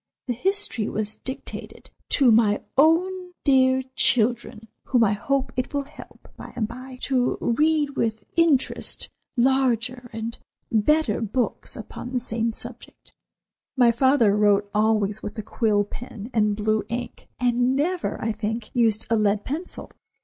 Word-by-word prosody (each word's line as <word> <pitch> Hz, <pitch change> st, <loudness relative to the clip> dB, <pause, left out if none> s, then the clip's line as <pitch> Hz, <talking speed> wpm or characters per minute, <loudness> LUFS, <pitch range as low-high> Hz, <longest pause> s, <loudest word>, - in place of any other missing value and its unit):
The 245 Hz, -, -1 dB
history 370 Hz, -, 0 dB
was 215 Hz, 0 st, -2 dB
dedicated: 260 Hz, -, -7 dB, 0.2 s
"To 265 Hz, -4 st, +5 dB
my 215 Hz, -2 st, +3 dB
own 360 Hz, +5 st, +2 dB
dear 260 Hz, -2 st, +4 dB
children, 235 Hz, 0 st, +2 dB, 0.2 s
whom 245 Hz, -3 st, +3 dB
I 210 Hz, -2 st, +3 dB
hope 265 Hz, +4 st, -1 dB
it 255 Hz, +3 st, -3 dB
will 285 Hz, -, 0 dB
help, 275 Hz, -, -14 dB
by -, -, -10 dB
and 225 Hz, -3 st, -1 dB
by, 255 Hz, +2 st, -9 dB
to 255 Hz, -2 st, +1 dB
read 300 Hz, +4 st, +2 dB
with 225 Hz, -5 st, -2 dB
interest 325 Hz, -6 st, +1 dB, 0.3 s
larger 250 Hz, -1 st, +1 dB
and 225 Hz, +1 st, -5 dB, 0.3 s
better 230 Hz, +2 st, +2 dB
books 230 Hz, +3 st, -2 dB
upon 245 Hz, -, -8 dB
the 250 Hz, -, +1 dB
same 230 Hz, -1 st, -1 dB
subject." 235 Hz, +2 st, -9 dB, 0.6 s
My 245 Hz, -2 st, +6 dB
father 235 Hz, -3 st, +3 dB
wrote 205 Hz, -1 st, +3 dB
always 215 Hz, -1 st, +1 dB
with 210 Hz, -, -7 dB
a 215 Hz, -, -4 dB
quill 210 Hz, -1 st, +1 dB
pen 220 Hz, +1 st, -9 dB
and 210 Hz, -2 st, +2 dB
blue 215 Hz, +1 st, 0 dB
ink, 240 Hz, +1 st, -5 dB
and 245 Hz, +1 st, +2 dB
never, 345 Hz, +6 st, -1 dB
I 225 Hz, -, 0 dB
think, 220 Hz, +1 st, -4 dB
used 225 Hz, -3 st, +2 dB
a -, -, +5 dB
lead 210 Hz, -1 st, +1 dB
pencil. 320 Hz, +7 st, -5 dB
240 Hz, 145 wpm, -24 LUFS, 215-265 Hz, 0.6 s, My